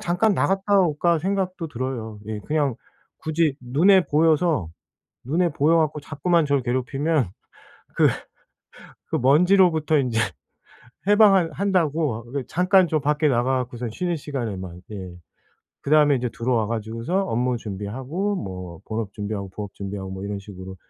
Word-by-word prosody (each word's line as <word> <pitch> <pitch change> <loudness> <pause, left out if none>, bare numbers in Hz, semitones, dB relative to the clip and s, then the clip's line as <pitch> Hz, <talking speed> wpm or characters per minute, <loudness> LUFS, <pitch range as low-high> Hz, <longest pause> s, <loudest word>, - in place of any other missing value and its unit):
잠깐 190 +5 +2
나갔다 195 +2 +2
올까.' 170 0 +2
생각도 185 -1 -2
들어요 115 -5 -5
예. 110 -1 -3
그냥 145 -2 0 0.4
굳이 155 -2 0
눈에 170 +10 +4
보여서, 155 - +2 0.6
눈에 170 +7 +1
보여 150 +3 +3
갖고 155 -1 0
자꾸만 165 +3 +1
저를 140 -2 +1
괴롭히면 130 - 0 0.7
그 - - +5 1.0
그 - - +1
먼지로부터 160 +2 +4
인제 125 -4 0 0.9
해방한 200 -5 +5
한다고 160 - 0
그 140 -2 -2
잠깐 185 0 +3
좀 155 0 +1
밖에 150 +2 +1
나가 130 0 +1
갖고선 125 -1 -4
쉬는 175 +8 -2
시간에만 100 - -5
예. 95 -3 -7 0.7
그다음에 150 -1 +4
인제 125 0 -2
들어와 115 -2 0
가지고서 115 - -2
업무 125 -4 0
준비하고 125 - -4
뭐 90 - -7
본업 110 -2 -3
준비하고 100 -2 -4
부업 100 0 -7
준비하고 100 -1 -6
뭐 95 +1 -6
이런 100 0 -4
식으로 95 -1 -10
140 Hz, 315 characters per minute, -23 LUFS, 110-170 Hz, 1.0 s, 그